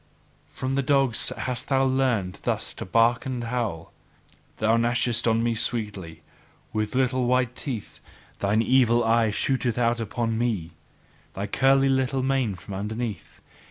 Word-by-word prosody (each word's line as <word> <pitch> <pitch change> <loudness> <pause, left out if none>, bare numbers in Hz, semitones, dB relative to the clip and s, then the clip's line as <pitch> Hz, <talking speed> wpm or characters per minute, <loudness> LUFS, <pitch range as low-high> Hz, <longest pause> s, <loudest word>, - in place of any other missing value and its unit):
From 130 +1 -4
the 140 - +1
dogs 135 -3 +2
hast 125 -1 -4
thou 135 -1 +3
learned 130 -8 0
thus - - -2
to - - -7
bark 115 +6 +2
and 125 -2 -3
howl. 115 -9 -3 0.6
Thou 110 +1 +2
gnashest 120 0 +1
on 115 0 +2
me 120 0 +1
sweetly 100 -8 -2 0.5
with 110 +2 -2
little 130 -1 +1
white 125 -1 +1
teeth; 125 -7 -5 0.4
thine 105 +3 +2
evil 120 -2 +3
eyes 115 -2 +2
shoot 125 -4 0
out 120 -1 +1
upon 115 +1 -2
me, 105 -9 -1 0.6
thy 100 - -3
curly 135 +5 +3
little 130 0 +1
mane 130 -6 0
from 90 +2 -10
underneath! 105 0 -5
120 Hz, 145 wpm, -25 LUFS, 110-130 Hz, 0.6 s, thou